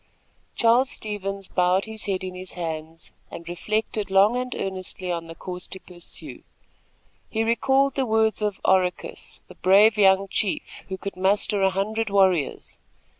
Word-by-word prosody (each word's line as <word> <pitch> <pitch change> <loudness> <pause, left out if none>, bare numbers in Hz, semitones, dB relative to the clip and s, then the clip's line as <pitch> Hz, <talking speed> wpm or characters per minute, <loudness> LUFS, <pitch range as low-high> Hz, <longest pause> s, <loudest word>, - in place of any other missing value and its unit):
Charles 240 +3 +4
Stevens 200 -4 -5
bowed 180 +1 +2
his 220 -1 -6
head 190 -2 -1
in 185 -1 -5
his 185 0 -8
hands 160 -1 -6 0.2
and 170 - -9
reflected 210 +3 -2
long 195 +4 +5
and 250 0 -2
earnestly 185 -1 -4
on 170 -1 -3
the 165 - -9
course 180 +1 -7
to 190 - -7
pursue. 175 -2 -10 0.9
He 220 0 0
recalled 265 +4 +2
the 265 -2 -1
words 220 0 +2
of 210 -2 -1
Oracus, 185 -1 0
the - - -12
brave 205 +3 +5
young 195 0 +5
chief, 195 0 -2
who 190 - -4
could 200 +1 -6
muster 195 +2 +1
a 190 - +4
hundred 210 +3 -1
warriors. 190 -7 +1
195 Hz, 155 wpm, -24 LUFS, 185-220 Hz, 0.9 s, long